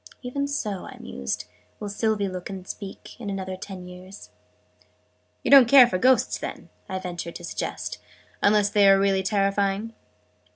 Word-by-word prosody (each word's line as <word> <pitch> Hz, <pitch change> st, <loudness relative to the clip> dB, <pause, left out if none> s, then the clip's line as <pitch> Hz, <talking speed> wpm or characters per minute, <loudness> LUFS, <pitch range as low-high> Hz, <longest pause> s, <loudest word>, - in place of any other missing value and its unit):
"Even 280 Hz, +3 st, -2 dB
so," 215 Hz, -9 st, -3 dB
I -, -, -11 dB
mused, 70 Hz, 0 st, -4 dB, 0.3 s
"will 210 Hz, -, -5 dB
Sylvie 205 Hz, 0 st, 0 dB
look 185 Hz, -1 st, -6 dB
and 190 Hz, -1 st, -8 dB
speak, 195 Hz, -2 st, -9 dB
in 220 Hz, -4 st, -5 dB
another 190 Hz, -1 st, -4 dB
ten 185 Hz, -1 st, -8 dB
years." 185 Hz, +2 st, -12 dB, 1.1 s
"You -, -, -1 dB
don't 270 Hz, -4 st, +9 dB
care 270 Hz, -2 st, +9 dB
for 185 Hz, -6 st, -2 dB
Ghosts, 255 Hz, +2 st, +3 dB
then," -, -, -7 dB, 0.2 s
I 190 Hz, -, -2 dB
ventured 175 Hz, -2 st, -6 dB
to -, -, -8 dB
suggest, -, -, -4 dB, 0.4 s
"unless 205 Hz, 0 st, +3 dB
they 200 Hz, -1 st, +5 dB
are 195 Hz, -, +7 dB
really 195 Hz, -1 st, +2 dB
terrifying?" 200 Hz, +2 st, 0 dB
195 Hz, 160 wpm, -25 LUFS, 185-215 Hz, 1.1 s, don't